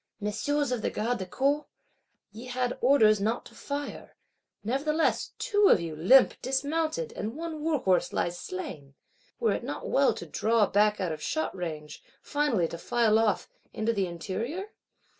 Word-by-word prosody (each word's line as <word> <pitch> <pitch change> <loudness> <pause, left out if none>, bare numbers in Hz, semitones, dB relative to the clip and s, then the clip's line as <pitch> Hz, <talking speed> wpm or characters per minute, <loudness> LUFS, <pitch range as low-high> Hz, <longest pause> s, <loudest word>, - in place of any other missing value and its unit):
' - - -56
Messieurs 290 +5 -1
of 245 -3 -1
the - - 0
Garde 235 +2 -1
du 185 - -5
Corps, 280 +8 0 0.6
ye 225 +4 -10
had 250 0 -1
orders 220 -6 +5
not 225 +4 -1
to - - -14
fire; 285 0 -6 0.5
nevertheless 295 +8 0
two 410 -1 +3
of - - +6
you 165 -2 -5
limp 240 +13 +5
dismounted, 315 - -1
and 220 +4 -4
one 320 -2 -5
war 320 -1 +2
horse 190 -8 +1
lies 175 - -1
slain. 150 -7 -7 0.4
Were 460 - +2
it - - -2
not - - -5
well - - +3
to - - -7
draw 225 -1 +2
back 210 +1 +2
out 185 -4 -1
of 155 -1 -5
shot 315 - -2
range; 155 -4 -6 0.2
finally 285 - 0
to 170 - -7
file 225 +1 +2
off,—into 220 +1 -1
the 195 -3 0
interior? 230 - -4
230 Hz, 165 wpm, -28 LUFS, 190-290 Hz, 0.6 s, of